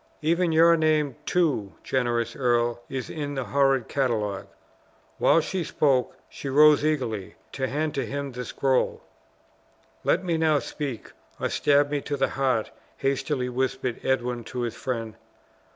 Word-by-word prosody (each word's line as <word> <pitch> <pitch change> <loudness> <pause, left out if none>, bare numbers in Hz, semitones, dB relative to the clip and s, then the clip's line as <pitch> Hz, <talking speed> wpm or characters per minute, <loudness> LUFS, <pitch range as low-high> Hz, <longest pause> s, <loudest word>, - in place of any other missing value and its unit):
Even 170 +2 +2
your 165 +1 +6
name, 155 -4 +1
too 145 - +1
generous 120 -2 -1
earl, 120 -2 +1
is 130 -2 -4
in 145 -2 -4
the 135 - -2
horrid 135 -2 +2
catalogue." 110 -8 -1 0.7
While 165 - +5
she 185 +2 -2
spoke, 140 -6 +1
she 140 - -7
rose 150 +2 +6
eagerly, 125 -10 -1 0.2
to 130 -1 -2
hand 150 +3 -1
to 135 - -1
him 140 0 -4
the 125 0 -5
scroll. 130 +1 0 1.0
"Let 185 - +2
me 170 -3 0
now 155 -2 +3
speak, 140 -5 -5 0.3
or - - -1
stab 145 0 +3
me 145 -1 0
to 145 0 -3
the 135 - +1
heart!" 130 -5 0 0.3
hastily 135 -1 -1
whispered 125 -1 -2
Edwin 125 -2 0
to 125 - -5
his 120 -2 -2
friend. 115 -4 -4
135 Hz, 150 wpm, -26 LUFS, 125-150 Hz, 1.0 s, your